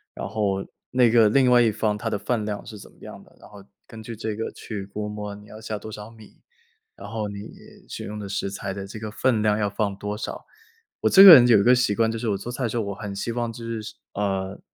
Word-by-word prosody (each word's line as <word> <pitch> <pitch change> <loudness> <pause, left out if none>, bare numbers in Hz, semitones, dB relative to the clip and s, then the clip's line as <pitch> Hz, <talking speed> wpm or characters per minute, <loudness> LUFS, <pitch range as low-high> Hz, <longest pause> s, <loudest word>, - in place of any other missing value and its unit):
然 - - -5
后 100 -3 -1 0.2
那 125 -2 +3
个 115 -3 +5
另 130 +2 +3
外 120 - +6
一 115 -2 +3
方 105 0 -1
他 115 +2 -3
的 105 - -1
饭 115 +1 -2
量 105 -1 -5
是 105 - -10
怎 - - -14
么 - - -26
样 - - -11
的， - - -23
然 - - -15
后 100 -1 -14 0.2
根 110 -1 -11
据 115 +1 -8
这 110 -1 -4
个 115 - -4
去 105 -4 -7
估 105 +1 -5
摸 105 -1 -6
你 105 - -14
要 110 +1 -12
下 110 -1 -4
多 110 +2 -9
少 105 0 -9
米， 110 -2 -18 0.5
然 - - -10
后 110 -2 -4
你 100 0 -7 0.5
选 - - -7
用 105 +1 -6
的 105 - -6
食 100 0 -3
材 95 0 -5
的 100 0 -7
这 105 +2 -9
个 110 -1 -6
分 115 0 +1
量 105 0 +2
要 105 -1 0
放 100 -1 -2
多 105 +1 -5
少。 - - -6 0.6
我 - - +3
这 195 - +8
个 190 -4 +13
人 125 -2 +7
有 115 -4 +6
一 - - +2
个 125 +3 +6
习 120 -4 +1
惯， 115 +1 +1
就 115 - -4
是 115 - -4
我 100 - 0
做 120 +5 -7
菜 130 - -4
的 115 - 0
时 - - -5
候， 115 - 0
我 100 -1 -5
很 100 -1 -7
希 115 - -3
望 120 -1 -3
就 115 - -10
是 115 -2 -5 0.2
呃， 95 -1 -2
105 Hz, 295 characters per minute, -24 LUFS, 100-115 Hz, 0.6 s, 个